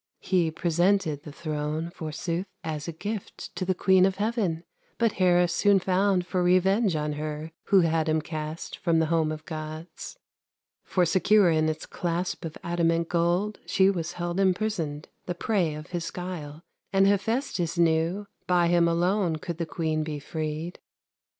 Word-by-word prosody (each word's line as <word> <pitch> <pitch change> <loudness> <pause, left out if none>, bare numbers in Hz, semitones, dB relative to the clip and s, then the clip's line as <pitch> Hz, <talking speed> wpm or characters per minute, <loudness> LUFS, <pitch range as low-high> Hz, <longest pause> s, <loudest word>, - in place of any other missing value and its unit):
He 180 -4 +1
presented 170 -1 +1
the 150 - -10
throne, 155 +1 -3
Forsooth, 170 +3 -4 0.2
as 155 -1 -4
a - - -2
gift 205 +5 -6
To 180 - -2
the 185 0 +1
queen 190 0 +4
of 190 - -2
heaven; 205 -6 -1 0.3
But 230 -2 +2
Hera 180 -2 +3
soon 200 +4 +3
found 185 0 +2
For 180 0 -1
revenge 185 +2 +3
on 150 0 -1
her 155 +1 -5
Who 195 -2 +5
had 160 -1 +1
him 155 0 +2
cast 155 +1 -6
From 170 -2 +2
the 160 - +3
home 160 -2 +2
of 155 0 -7
Gods. 155 +1 -7 0.7
For 180 -2 +1
secure 185 +2 +4
in 155 0 +2
its 155 - -4
clasp 175 +1 -3
Of 160 - -6
adamant 170 -1 +1
gold 175 +5 +1
She 190 0 +4
was 170 -3 -3
held 175 +1 -3
imprisoned, 185 -6 0 0.2
The 180 - -2
prey 175 -5 0
of 155 +2 -9
his 175 -2 -3
guile; 165 -4 -6 0.3
And 195 0 +4
Hephestus 200 - 0
knew 170 +4 +2 0.2
By 175 -1 +3
him 170 -1 +4
alone 175 +1 +1
Could 165 +2 -6
the 170 - -2
queen 155 -1 -1
be 155 -1 -4
freed. 155 +3 -4
170 Hz, 165 wpm, -27 LUFS, 160-185 Hz, 0.7 s, Who